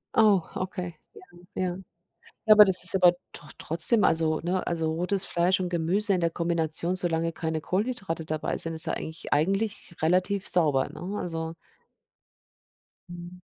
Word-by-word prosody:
Oh, 205 -5 +4
okay. 180 -2 -6 0.2
Ja, 430 - -13 0.3
ja. 185 -1 -2 0.7
Ja, 215 - +7
aber 210 -1 +8
das 185 -2 +5
ist 180 - +8
aber 180 -2 +4 0.2
doch 150 - -11
trotzdem 170 +8 +4
also, 160 -1 +1
ne 180 +2 -3
also 165 -2 -2
rotes 185 +3 -2
Fleisch 180 +1 0
und 180 - -3
Gemüse 180 +5 0
in 185 - 0
der 170 -1 0
Kombination, 170 +1 -2
solange 165 -2 -2
keine 160 -1 -4
Kohlenhydrate 195 -5 -3
dabei 155 0 -4
sind, 165 0 +1
ist 160 - +5
ja - - -2
eigentlich 160 +1 -7
eigentlich 195 +4 -2
relativ 185 +4 0
sauber, 150 -7 +2
ne, 190 +5 -7
also 165 -3 -5 1.6
Mhm. 175 +1 -11
175 Hz, 155 wpm, -25 LUFS, 165-190 Hz, 1.6 s, aber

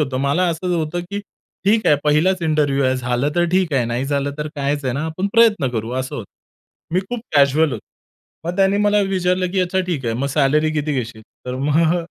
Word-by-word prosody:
होतो. 135 -3 -1
मला 140 +7 +1
असं 175 +2 -1
होतं, 160 +2 -2
की 205 0 -3 0.4
ठीक 215 +3 +3
आहे 150 - +5
पहिलाच 165 +5 +2
इंटरव्ह्यू 150 -3 +1
आहे. 130 0 +2
झालं 125 +2 -1
तर 175 - +3
ठीक 185 -3 +1
आहे 130 -4 +2
नाही 120 +3 -2
झालं 140 0 -1
तर 150 0 -3
काहीच 140 0 -1
आहे 130 - 0
ना 145 +3 -2
आपण 170 +5 -2
प्रयत्न 220 - +4
करू 115 -1 -3
असं 130 - -5
होतं. 105 - -8 0.6
मी 185 - +3
खूप 225 +5 -6 0.2
कॅज्युअल 145 +2 +4
होतो. 115 - -4 0.6
मग 175 +2 -3
त्याने 195 0 +3
मला 210 0 +3
विचारलं, 180 -1 0
की 190 - +1
"अच्छा 185 +1 0
ठीक 160 -8 -3
आहे 115 - 0
मग 130 +4 -1
सॅलरी 150 +2 +2
किती 150 0 -1
घेशील?" 115 -4 -4 0.2
तर 125 - -3
मग 160 +3 +3
150 Hz, 215 wpm, -20 LUFS, 135-180 Hz, 0.6 s, आहे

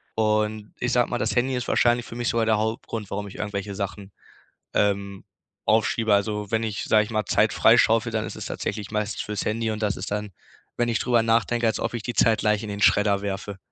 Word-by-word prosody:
Und 110 -1 0
ich 125 - -1
sage 120 -1 +3
mal, 120 - -1
das 110 0 -1
Handy 130 +2 +1
ist 125 - -3
wahrscheinlich 120 0 +2
für - - -9
mich 120 0 -1
sogar 115 -1 +1
der 110 -1 +3
Hauptgrund, 110 -1 -3
warum 100 +1 -3
ich 100 - -11
irgendwelche 100 -1 -4
Sachen, 100 0 -5 0.6
ähm, 100 -1 0 0.4
aufschiebe. 110 0 +2
Also 105 0 -1
wenn 110 0 +1
ich, 110 -2 -3
sage 110 -1 +4
ich 105 - -10
mal, 110 -1 0
Zeit - - +2
freischaufele, 115 +1 +4
dann 110 -1 -1
ist - - -7
es - - -6
tatsächlich 105 -2 -4
meistens 105 -1 -2
für's 105 -2 -4
Handy 110 +1 -1
und 110 - -5
das 105 -1 0
ist 95 - -6
dann, 105 0 -3 0.5
wenn 120 0 0
ich 115 -3 +1
drüber 120 -2 +2
nachdenke, 115 +1 +1
als 110 - +1
ob - - -2
ich 120 - -3
die 120 - -3
Zeit 110 -1 +3
gleich 105 0 +1
in - - -6
den 100 0 -4
Schredder 100 -1 +4
werfe. 100 0 -4
110 Hz, 225 wpm, -24 LUFS, 105-115 Hz, 0.6 s, sage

